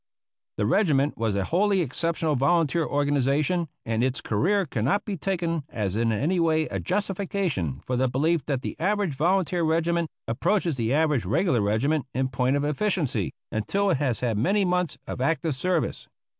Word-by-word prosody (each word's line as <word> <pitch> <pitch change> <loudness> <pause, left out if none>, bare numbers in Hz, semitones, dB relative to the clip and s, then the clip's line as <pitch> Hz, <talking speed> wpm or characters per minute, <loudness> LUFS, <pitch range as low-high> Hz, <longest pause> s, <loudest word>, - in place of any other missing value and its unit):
The 105 - +1
regiment 145 - +2
was 110 -3 -1
a 100 - 0
wholly 195 - +2
exceptional 160 +1 -1
volunteer 160 +4 +2
organization, 145 +4 +1 0.2
and 115 +1 0
its 130 +3 0
career 180 - +1
cannot 135 - 0
be 205 - -3
taken 170 -3 -2
as 100 -3 -2
in 115 +1 +1
any 150 - 0
way 160 -1 +3
a 95 - -4
justification 180 - -2
for 125 - -1
the 130 +1 +2
belief 155 +6 +1
that 135 -4 -1
the - - -4
average 200 -2 0
volunteer 175 +4 +1
regiment 165 +1 +1 0.2
approaches 170 - 0
the 115 -2 -1
average 150 - +2
regular 135 - +2
regiment 135 +8 0
in 130 0 0
point 130 +1 +1
of 145 - 0
efficiency 150 - 0 0.2
until 195 - 0
it - - +2
has 130 -5 -1
had 115 -4 0
many 195 - +2
months 180 -1 0
of - - -5
active 160 +2 0
service. 170 +4 -1
150 Hz, 170 wpm, -25 LUFS, 125-175 Hz, 0.2 s, way